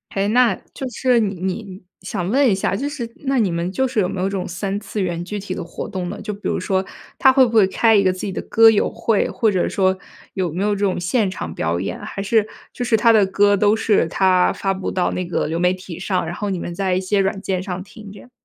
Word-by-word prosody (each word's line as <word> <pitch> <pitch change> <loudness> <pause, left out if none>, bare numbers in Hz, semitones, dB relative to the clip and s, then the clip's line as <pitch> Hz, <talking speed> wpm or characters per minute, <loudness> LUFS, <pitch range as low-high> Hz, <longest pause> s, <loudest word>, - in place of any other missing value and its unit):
诶， 195 0 +1
那 245 +1 +4 0.2
就 265 - -5
是 250 0 +2
你 200 -2 -1
你 190 0 -4 0.2
想 180 -1 -4
问 270 +4 +3
一 - - +3
下， 190 0 -1
就 280 +8 -2
是 245 -6 -5 0.2
那 270 -1 +1
你 210 -5 +2
们 170 +2 -2
就 265 +7 0
是 245 -4 -1
有 180 - 0
没 195 - -5
有 185 - 0
这 - - -3
种 190 -2 -3
三 195 +3 -3
次 210 0 -5
元 175 -2 -2
具 210 +3 -5
体 190 -1 -5
的 180 - -5
活 170 - -7
动 180 -2 -4
呢？ - - -6
就 210 - -4
比 205 - -5
如 - - -1
说 190 0 -1 0.3
他 265 - +6
会 260 0 +5
不 235 - -3
会 215 -3 +6
开 225 +3 +3
一 200 - +4
个 185 - +3
自 185 - -8
己 200 - -3
的 - - -4
歌 225 0 +6
友 215 -2 +2
会， 225 -3 0
或 225 - +1
者 185 -3 0
说 190 -1 +1 0.4
有 185 -4 -2
没 180 +5 -2
有 205 0 +1
这 - - -6
种 195 -3 0
现 195 +3 0
场 80 - -6
表 85 +2 -1
演， 95 - -4
还 195 - -6
是 210 +1 +2 0.3
就 245 - -4
是 230 -2 +2
他 230 +1 +5
的 210 -3 +5
歌 205 +1 +3
都 205 +1 +3
是 220 -4 +2
他 185 -2 +3
发 195 -1 -1
布 190 0 -4
到 185 - 0
那 185 - -3
个 170 -3 -1
流 160 - -2
媒 180 +1 +3
体 185 -2 -9
上， 185 -1 -1
然 170 +2 -5
后 205 -1 -3
你 185 -2 -2
们 175 - -5
在 190 0 0
一 185 - +1
些 195 +2 0
软 195 0 0
件 190 -2 -2
上 185 -1 -5
听 210 0 -12
这 205 - -12
样？ 250 - -16
195 Hz, 300 characters per minute, -20 LUFS, 185-215 Hz, 0.4 s, 他